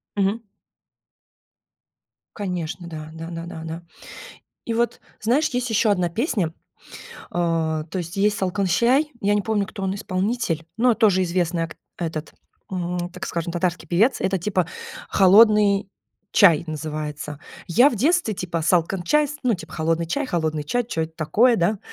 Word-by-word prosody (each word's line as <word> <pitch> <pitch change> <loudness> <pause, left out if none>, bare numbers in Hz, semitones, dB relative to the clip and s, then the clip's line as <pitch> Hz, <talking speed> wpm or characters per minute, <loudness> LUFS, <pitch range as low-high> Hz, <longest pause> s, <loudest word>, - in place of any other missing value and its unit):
Мгм. 200 +2 +1 2.0
Конечно, 180 -4 -4
да 155 -2 -7
да 165 0 -7
да 165 -1 -6
да 165 -2 -8
да 160 0 -5
-да. 170 - -9 0.8
И 230 - -2
вот 235 +1 0 0.2
знаешь, 255 +8 +2
есть 250 -1 -2
еще 225 0 +3
одна 180 -3 +2
песня, 205 - 0 0.6
э, - - -12 0.2
то 165 -2 0
есть 175 -1 -4
есть 205 +1 +2
"Салкын 190 +1 0
чәй", 250 - +3
я 205 +1 +2
не 205 - +1
помню, 205 -1 0
кто 195 - -8
он 190 0 -1
исполнитель, 195 -3 -2
но 240 +1 +4
тоже 210 -5 +3
известный 175 -1 0
ак 165 - -8 0.2
этот, 160 -3 -4 0.4
м, 175 -1 -3
так 180 +1 -6
скажем 170 0 -3
татарский 175 +1 -2
певец. 220 +9 +3
Это 190 0 +1
типа 185 -1 0 0.4
"Холодный 205 0 +5 0.4
чай" 170 -6 +6
называется. 150 -1 -5 0.3
Я 245 - +5
в 235 - -4
детстве, 285 - +2
типа 175 -3 -3
"Салкын 175 +2 +1
чәй", 300 - +2
ну 250 -3 +2
типа 160 -3 -9
холодный 165 +1 0
чай, 280 - -1
холодный 160 - -1
чай. 245 +11 0
Чё 165 -8 -2
это 160 0 -5
такое, 230 +10 +3
да? 190 +3 +1
185 Hz, 160 wpm, -23 LUFS, 165-215 Hz, 2.0 s, чай